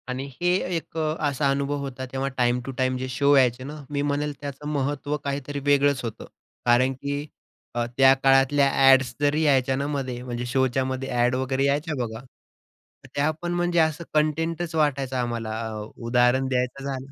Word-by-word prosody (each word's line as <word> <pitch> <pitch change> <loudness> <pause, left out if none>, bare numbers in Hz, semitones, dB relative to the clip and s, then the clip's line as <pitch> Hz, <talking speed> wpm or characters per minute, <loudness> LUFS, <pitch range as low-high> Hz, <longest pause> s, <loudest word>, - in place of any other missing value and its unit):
आणि 130 +1 -4 0.2
हे 175 0 +3 0.2
एक 165 0 -5
अ, 155 -1 0
असा 140 0 0
अनुभव 140 +1 -1
होता, 135 -2 -5
तेव्हा 135 +1 -2
टाईम 120 0 +2
टू 135 - -4
टाईम 130 0 +1
जे 130 +1 -4
शो 140 +3 +3
यायचे 130 -2 +3
ना, 150 +3 -7
मी 145 -1 -1
म्हणेल 145 +1 -1
त्याचं 145 0 -6
महत्व 145 0 -1
काहीतरी 140 0 -3
वेगळंच 140 -2 +3
होतं 115 -3 -6 0.4
कारण 125 +2 +4
की 140 +2 -4 0.5
अ, 120 0 0
त्या 135 0 +7
काळातल्या 135 +1 +4
अ‍ॅड्स 135 -2 +5
जरी 145 +2 +2
यायच्या 135 -3 +3
ना, 140 +2 -2
मध्ये 130 -4 -3
म्हणजे 125 -1 -4
शो 130 +2 +2
च्या 130 +1 -1
मध्ये 130 0 -3
अ‍ॅड 125 0 +2
वगैरे 130 +1 0
यायच्या 150 +3 0
बघा, 110 +1 -8 0.9
त्या 145 +2 +2
पण 175 0 -2
म्हणजे 175 0 +1
असं 160 +1 +1
कंटेंटच 160 +2 0
वाटायचा 140 -4 0
आम्हाला. 115 -2 -3 0.2
अ, 110 -1 -5 0.2
उदाहरण 125 +2 +3
द्यायचं 125 +1 -1
झालं 135 -1 -5
135 Hz, 180 wpm, -25 LUFS, 130-145 Hz, 0.9 s, त्या